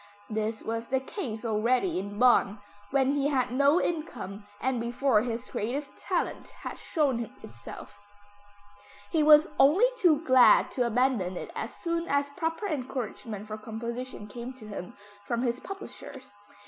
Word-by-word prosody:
This 215 0 -2
was 230 +1 -3
the 265 0 +1
case 250 - -5
already 235 - +1
in 200 +2 -6
Bonn, 230 -4 +4 0.3
when 270 0 +3
he 285 0 +1
had 260 -4 +1
no 280 +6 +4
income 220 - -4
and 255 -2 0
before 235 -1 +2
his 235 +1 -3
creative 260 +5 -3
talent 365 -3 -2
had - - -6
shown 265 - 0
itself. 115 +1 -10 1.1
He 320 - +3
was 300 0 +7
only 310 - +6
too 315 -7 +4
glad 260 -2 +6
to 245 -2 +1
abandon 230 -7 +1
it - - -6
as - - -4
soon 335 -1 -2
as 285 0 +1
proper 330 +4 -2
encouragement 245 - -4
for 215 0 -6
composition 235 +2 -6
came 240 +4 -7
to 240 -5 -12
him 200 -4 -7 0.3
from 235 +4 -1
his 245 0 0
publishers. 285 - -9
255 Hz, 150 wpm, -28 LUFS, 220-285 Hz, 1.1 s, was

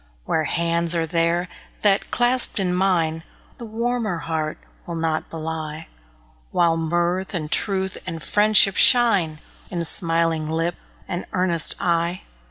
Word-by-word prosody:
Warm 160 - 0
hands 170 0 +1
are 165 -1 0
there, 170 +2 0 0.4
that, 200 -1 +2
clasped 245 0 +2
in 180 -2 0
mine, 170 -4 +1 0.4
The 235 - -7
warmer 230 -3 -2
heart 160 -2 -3 0.3
will 170 - -5
not 160 -1 -2
belie; 160 -1 -6 0.6
While 170 -2 +2
mirth 175 +4 -1
and 155 -2 -4
truth, 190 -2 0
and 165 -3 -5
friendship 205 -2 +4
shine 195 -11 +4 0.3
In 170 -2 -2
smiling 165 -2 +1
lip 165 +2 -1 0.3
and 175 - -4
earnest 180 -4 +2
eye. 170 0 -1
170 Hz, 130 wpm, -22 LUFS, 165-190 Hz, 0.6 s, friendship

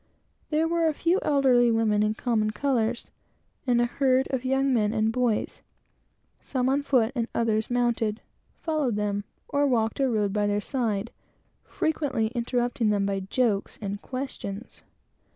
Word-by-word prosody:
There 315 +1 +2
were 335 0 +1
a 310 - 0
few 340 +5 +2
elderly 260 -4 +4
women 225 -2 +2
in 215 +1 +1
common 220 -3 0
colors; 235 -1 -1 0.6
and 240 -1 +3
a 240 - +4
herd 260 +1 +2
of 260 -2 -1
young 270 +1 +1
men 215 -3 +2
and 220 0 +1
boys, 240 -3 -1 0.8
some 255 -1 -1
on 275 +2 +2
foot 255 -5 +2
and 235 -4 -1
others 220 -2 +1
mounted, 235 -3 0 0.4
followed 305 -8 -1
them, 205 -1 -1 0.2
or 285 0 +1
walked 225 -3 0
or 270 -1 +2
rode 210 -4 0
by 210 -1 +1
their 205 0 +1
side, 225 -2 -2 0.5
frequently 295 - -1
interrupting 240 -1 0
them 200 -1 +1
by 195 -1 -1
jokes 205 +1 -1
and 200 -1 -4
questions. 255 -5 -6
240 Hz, 150 wpm, -26 LUFS, 215-265 Hz, 0.8 s, elderly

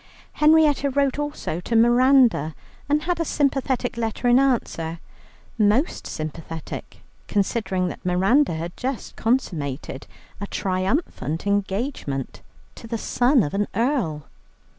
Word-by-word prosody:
Henrietta 300 -2 +4
wrote 280 0 +1
also 290 - -3
to 230 +6 -3
Miranda, 240 - +4 0.3
and 300 +1 +2
had 350 0 -1
a - - +2
sympathetic 270 -5 0
letter 230 +1 -2
in 245 +1 +6
answer, 170 -11 0 0.6
most 215 - +2
sympathetic, 160 +1 -7 0.3
considering 195 -2 0
that - - -7
Miranda 190 - +3
had 170 +2 -5
just 260 0 -4
consummated 155 - -2 0.3
a 205 - -4
triumphant 185 - -2
engagement 200 - -2 0.3
to - - -11
the 230 0 -2
son 245 +2 +2
of 145 - -4
an 205 +1 0
earl. 225 - 0
230 Hz, 120 wpm, -23 LUFS, 175-270 Hz, 0.6 s, in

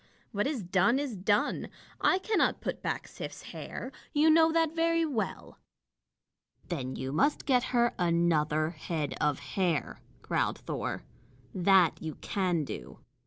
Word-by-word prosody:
What 205 0 0
is 275 -8 -2
done, 190 +7 +3
is 275 -5 -2
done. 205 +2 +1 0.3
I 370 - +4
cannot 425 +3 +1
put - - -4
back - - -3
Sif's - - -8
hair. - - -6 0.2
You 310 +1 +5
know 320 0 +6
that 325 -1 +1
very 330 0 +2
well." 260 -9 -4 1.1
"Then 130 -7 -3
you 130 0 -4
must 180 - +1
get 255 -2 +3
her 240 -1 +2
another 160 -3 +2
head 155 -3 -3
of 150 -2 +2
hair," 150 +4 -1 0.2
growled - - 0
Thor. - - -4 0.5
"That 185 -2 +4
you 160 -2 -5
can 180 -5 -1
do. 60 - -8
190 Hz, 140 wpm, -30 LUFS, -, 1.1 s, know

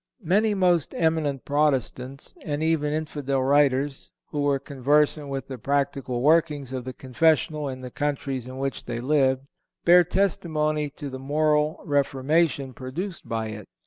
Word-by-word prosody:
Many 205 +5 +2
most 180 -5 +2
eminent 160 -5 0
Protestant, 140 -2 -1
and 150 +1 -2
even 160 -2 +1
infidel 145 -3 -1
writers, 140 0 +2 0.2
who 145 - -1
were 145 -1 +2
conversant 145 +2 +1
with 135 -1 -4
the 130 -2 -7
practical 135 -1 -1
workings 150 -4 +2
of 130 -2 -4
the 130 - -4
confessional 150 +2 +1
in 130 -1 -6
the 125 -1 -7
countries 135 -3 -2
in 130 0 -8
which 135 0 -3
they 115 - -4
lived, 130 0 +1 0.4
bear 175 +1 +8
testimony 155 -5 0
to 145 -2 -6
the 130 - -6
moral 150 +2 +1
reformation 140 -1 +1
produced 170 +10 -6
by 110 -1 -2
it. 105 -2 -8
145 Hz, 145 wpm, -25 LUFS, 130-155 Hz, 0.4 s, bear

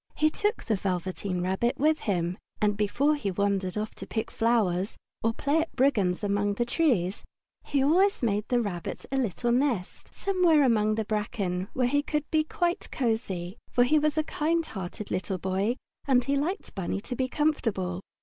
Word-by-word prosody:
He 310 0 +3
took 420 +5 -1
the 220 - +1
Velveteen 185 0 -2
Rabbit 190 +7 0
with 310 +2 +3
him, 180 -2 -1 0.2
and 210 -1 +2
before 240 +9 +2
he 285 -10 -2
wandered 195 0 0
off 215 +1 -3
to - - -8
pick 220 - -3
flowers, 210 -5 +1 0.3
or 225 - +3
play 285 +7 +1
at 325 - -5
brigands 220 -9 +2
among 205 0 +1
the 240 - 0
trees, 235 - +1 0.4
he 280 -2 +1
always 365 +4 +3
made 210 -2 +1
the 245 - +2
Rabbit 175 -5 -5
a - - 0
little 240 -1 0
nest 245 -7 -1
somewhere 360 -6 +3
among 215 -4 +3
the 220 0 -1
bracken, 205 -4 -2
where 255 - +1
he 290 +3 +2
would 300 -1 +1
be 315 -1 +3
quite 350 0 -1
cosy, 220 - -2
for 245 - +4
he 305 +5 +4
was 305 +1 0
a 310 - +3
kind 325 +2 0
hearted 195 - -6
little 185 +1 -1
boy 190 +6 0 0.3
and 255 -2 +4
he 280 +3 0
liked 340 +9 -2
Bunny 195 0 -2
to 250 - -5
be 255 +1 0
comfortable. 225 - 0
225 Hz, 180 wpm, -28 LUFS, 195-290 Hz, 0.4 s, for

